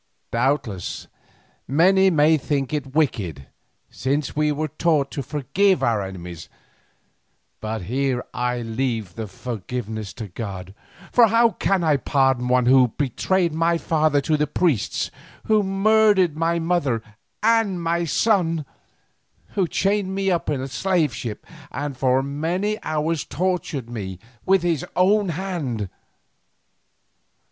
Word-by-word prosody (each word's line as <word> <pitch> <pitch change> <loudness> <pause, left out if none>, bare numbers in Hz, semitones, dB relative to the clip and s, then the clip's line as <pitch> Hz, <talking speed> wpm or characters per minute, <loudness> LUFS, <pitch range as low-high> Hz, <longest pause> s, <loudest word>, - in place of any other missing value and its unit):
Doubtless, 115 -7 -1 0.6
many 190 +7 +4
may 155 -2 +4
think 140 -2 -2
it 140 -2 -3
wicked, 95 - 0 0.5
since 140 +2 -2
we 150 0 +2
are 155 +2 -1
taught 155 -2 +1
to 140 - -3
forgive 150 +8 +1
our 115 -3 +2
enemies, 90 -4 -8 1.1
but 110 -2 -4
here 130 +4 -1
I 125 -1 -1
leave 115 -4 -2
the 110 +2 -5
forgiveness 110 0 -5
to 110 -3 -7
God, 95 -2 -7 0.4
for 240 -2 +6
how 230 +2 +4
can 195 -4 0
I 155 -3 +3
pardon 135 -2 +1
one 125 0 +3
who 130 0 +6
betrayed 155 - 0
my 165 +1 +2
father 155 -3 +2
to 155 +2 +1
the 150 0 +1
priests, 150 - 0 0.3
who 215 -1 +3
murdered 195 -3 +3
my 165 +2 +1
mother 160 -9 0 0.4
and 225 -5 +3
my 170 0 0
son, 165 -3 +1 0.8
who 190 -3 0
chained 195 +1 0
me 195 -1 +1
in 150 -6 -1
the 135 - -4
slave 170 -1 0
ship 110 -4 -6 0.2
and 145 -1 -4
for 130 +1 +2
many 175 +10 -2
hours 155 0 -1
tortured 175 -6 -2
me 100 -6 -6 0.3
with 190 -2 +4
his 170 -5 0
own 200 +2 +3
hand? 150 - -3
150 Hz, 130 wpm, -23 LUFS, 125-180 Hz, 1.1 s, for